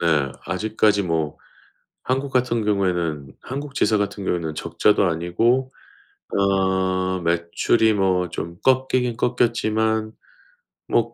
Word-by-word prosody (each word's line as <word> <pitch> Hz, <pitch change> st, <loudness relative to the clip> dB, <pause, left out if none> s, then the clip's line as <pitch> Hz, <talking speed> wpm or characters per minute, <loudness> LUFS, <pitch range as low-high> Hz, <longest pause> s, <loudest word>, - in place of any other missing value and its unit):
네. 75 Hz, -5 st, +2 dB
아직까지 105 Hz, -1 st, +1 dB
뭐 80 Hz, -4 st, -1 dB, 0.7 s
한국 135 Hz, +2 st, -1 dB
같은 120 Hz, -3 st, +1 dB
경우에는 85 Hz, -9 st, -1 dB
한국 140 Hz, +2 st, -6 dB
지사 110 Hz, -, +2 dB
같은 100 Hz, 0 st, -2 dB
경우에는 85 Hz, -4 st, -2 dB
적자도 85 Hz, +6 st, +2 dB
아니고 105 Hz, +10 st, +1 dB, 0.7 s
아 95 Hz, -1 st, +1 dB
매출이 85 Hz, +7 st, +2 dB
뭐 95 Hz, -3 st, +1 dB
좀 85 Hz, +2 st, -6 dB
꺾이긴 130 Hz, -2 st, +2 dB
꺾였지만 110 Hz, -2 st, 0 dB, 0.8 s
뭐 -, -, +1 dB
100 Hz, 235 characters per minute, -22 LUFS, 85-115 Hz, 0.8 s, 네